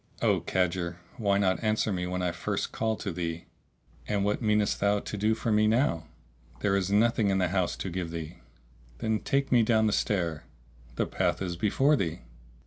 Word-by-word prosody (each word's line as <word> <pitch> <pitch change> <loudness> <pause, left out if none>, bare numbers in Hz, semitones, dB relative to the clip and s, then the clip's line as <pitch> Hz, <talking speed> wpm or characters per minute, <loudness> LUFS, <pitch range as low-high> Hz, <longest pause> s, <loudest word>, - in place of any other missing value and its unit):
"O - - +3
cadger, 85 -2 -1 0.2
why 100 -4 +2
not 95 +1 +1
answer 110 0 +1
me 90 -1 -2
when 90 0 -2
I 90 - +1
first - - -3
called 110 -1 -1
to 100 - -3
thee?" 85 -1 -4 0.6
"And 100 -1 0
what 105 +4 0
meanest 105 -2 +1
thou 100 0 +2
to 105 - -6
do 105 +2 +1
for 115 - -2
me 105 0 +4
now?" 110 - +1 0.5
"There 100 -1 +2
is 95 -1 0
nothing 110 0 +3
in 95 - +2
the 90 -2 +1
house 90 -1 0
to - - -4
give 90 -1 -3
thee." 85 +1 -6 0.6
"Then 110 - 0
take 140 0 0
me 120 -2 +6
down 110 -1 +3
the 105 - +2
stair." 85 -7 -1 0.5
"The - - 0
path 90 -2 0
is 90 -3 -3
before 135 - +3
thee." 85 - -2
100 Hz, 195 wpm, -28 LUFS, 90-110 Hz, 0.6 s, me